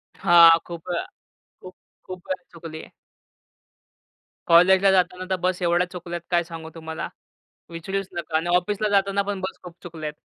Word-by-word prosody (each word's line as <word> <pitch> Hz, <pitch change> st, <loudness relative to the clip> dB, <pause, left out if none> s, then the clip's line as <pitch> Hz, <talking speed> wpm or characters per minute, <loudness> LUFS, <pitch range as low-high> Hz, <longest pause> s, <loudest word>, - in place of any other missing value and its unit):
हां, 170 Hz, -1 st, +7 dB
खूप 170 Hz, +1 st, -9 dB
अ, 175 Hz, -, -1 dB, 0.6 s
खूप-खूप 185 Hz, 0 st, -13 dB, 0.2 s
चुकली. 165 Hz, -1 st, -10 dB, 1.6 s
कॉलेजला 185 Hz, +3 st, +6 dB
जाताना 185 Hz, 0 st, +1 dB
तर 190 Hz, -, +1 dB
बस 185 Hz, 0 st, 0 dB
एवढ्या 175 Hz, +1 st, +2 dB
चुकल्यात, 175 Hz, -1 st, -6 dB
काय 175 Hz, 0 st, +3 dB
सांगू 165 Hz, -1 st, -9 dB
तुम्हाला, 160 Hz, 0 st, -6 dB, 0.6 s
विचारूच 190 Hz, +4 st, -4 dB
नका 170 Hz, -2 st, -2 dB
आणि 170 Hz, +2 st, -3 dB
ऑफिसला 205 Hz, +4 st, 0 dB
जाताना 200 Hz, 0 st, +2 dB
पण 200 Hz, -1 st, -4 dB
बस 190 Hz, -, -6 dB
खूप 175 Hz, -1 st, -11 dB
चुकल्या 160 Hz, -3 st, -7 dB
आहेत. 150 Hz, -, -5 dB
175 Hz, 140 wpm, -23 LUFS, 165-185 Hz, 1.6 s, हां